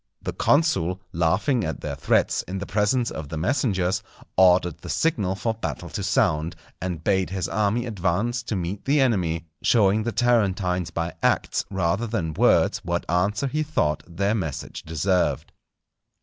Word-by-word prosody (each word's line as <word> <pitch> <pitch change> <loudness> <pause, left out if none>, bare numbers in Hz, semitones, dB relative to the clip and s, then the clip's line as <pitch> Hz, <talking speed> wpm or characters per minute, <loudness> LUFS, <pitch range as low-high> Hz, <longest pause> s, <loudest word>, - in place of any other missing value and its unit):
The - - -3
consul, 145 - +2
laughing 95 - +1
at - - -4
their - - -4
threats, - - +1
in 95 - -4
the 100 - -4
presence 110 +5 +1
of 75 -2 -6
the 80 - -4
messengers, 95 - 0 0.3
ordered 90 -2 +4
the - - -9
signal 105 - 0
for 110 +4 -1
battle 80 - -5
to - - -4
sound, 80 +3 +1 0.3
and 90 -3 -4
bade 95 -1 +1
his 95 -1 -2
army 105 +3 0
advance 105 +3 -1
to 110 - -2
meet 95 +2 -4
the 145 +2 +3
enemy; 90 -11 +1 0.2
showing 105 -2 +3
the 120 +2 -2
Tarentines 95 -8 +1
by 85 0 -3
acts - - +1
rather 95 +4 0
than 90 -8 -2
words - - +3
what 85 0 -3
answer 100 +8 +1
he 150 +3 -1
thought 75 - 0
their 100 +4 0
message 80 -11 -4
deserved. 80 -2 0
95 Hz, 160 wpm, -24 LUFS, 85-110 Hz, 0.3 s, ordered